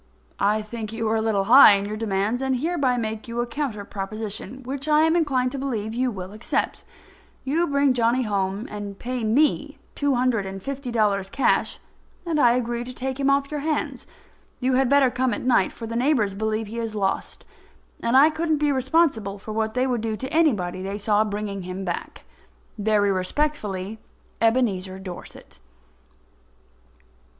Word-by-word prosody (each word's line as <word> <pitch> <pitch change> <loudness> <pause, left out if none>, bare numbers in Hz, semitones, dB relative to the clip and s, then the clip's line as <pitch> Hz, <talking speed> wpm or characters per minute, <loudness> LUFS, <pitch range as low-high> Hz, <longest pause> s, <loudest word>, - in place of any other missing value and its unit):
I 210 +2 +2
think 215 0 -6
you 225 0 -2
are 220 - +1
a - - 0
little 215 -3 +1
high 235 +1 +9
in 200 0 0
your 210 +1 -4
demands, 215 +2 -1
and 265 -1 +1
I - - 0
hereby 280 -4 0
make 220 -1 -4
you 235 0 -4
a 240 - +1
counter 235 -5 -4
proposition, 215 +6 -5
which 270 +3 -5
I 305 0 +5
am 320 +1 +3
inclined 260 -7 +1
to 275 - -5
believe 225 -5 -3
you 250 +2 0
will 190 -4 -6
accept. 215 +2 -2 0.6
You 325 +6 +1
bring 280 -1 +3
Johnny 240 +1 +2
home 200 0 -2
and 205 -1 -6
pay 250 +1 -4
me 290 +5 +1 0.2
two 285 -2 +1
hundred 240 -5 +1
and 190 0 -7
fifty 275 -1 -5
dollars 205 -4 +1
in - - -22
cash, 275 - +1 0.5
and 325 -3 0
I 240 -4 +5
agree 240 -1 -1
to 250 +1 -8
take 265 +1 -4
him 275 0 +2
off 275 +1 +1
your 300 - -2
hands. 305 +1 -2 0.5
You 255 0 +1
had 260 0 +3
better 280 -2 +4
come 250 -2 0
at - - -6
night, 245 -6 +3
for 230 - -8
the 230 +1 -5
neighbours 240 -5 +2
believe 220 +2 -2
he 225 +3 -6
is 225 -2 -4
lost, 195 -2 -2 0.6
and 235 +3 +3
I 295 +4 +7
couldn't 315 0 0
be 295 0 +1
responsible 260 - +1
for 210 +2 -8
what 220 +1 -2
they 255 +1 +2
would 245 -4 -1
do 220 -1 -2
to 260 - -6
anybody 205 - +1
they 195 +2 -4
saw 210 0 +2
bringing 205 -2 -4
him 185 +1 -6
back. 175 - -5 0.5
Very 210 -1 +2
respectfully, 205 -1 -2 0.4
EBENEZER 210 -6 +1
DORSET. 190 -2 -10
230 Hz, 185 wpm, -24 LUFS, 205-265 Hz, 0.6 s, high